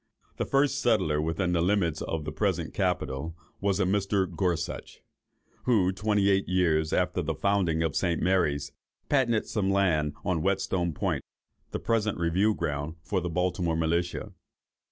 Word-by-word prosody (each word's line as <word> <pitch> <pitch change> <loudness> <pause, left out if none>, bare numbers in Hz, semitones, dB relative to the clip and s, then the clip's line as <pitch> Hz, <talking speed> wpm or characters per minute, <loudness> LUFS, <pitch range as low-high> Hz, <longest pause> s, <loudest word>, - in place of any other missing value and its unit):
The - - -1
first 140 +1 +2
settler 95 -11 +2
within 80 +3 -1
the 85 -1 +2
limits 85 -4 +1
of 80 -2 -3
the 75 - -3
present 85 0 -1
capital, 80 -4 -2 0.2
was 100 -1 0
a - - +3
Mr. 100 0 +1
Gorsuch, 90 -2 -2 0.7
who, 105 -7 +3
twenty 105 0 +1
eight 95 -1 +2
years 80 -4 +2
after 90 0 +1
the 80 -1 -2
founding 90 -3 +1
of 80 - -1
St. 85 -3 +1
Mary's, 75 -6 +1 0.4
patented 120 -6 +2
some 100 -3 -1
land 85 -7 +2
on 90 -4 0
Whetstone 95 -2 0
Point, - - -1 0.5
the - - -3
present 110 -2 0
review 90 +6 +2
ground 75 +2 -3
for 95 +1 -1
the 90 - -3
Baltimore 90 -1 0
militia. 85 +2 -1
90 Hz, 155 wpm, -28 LUFS, 80-100 Hz, 0.7 s, a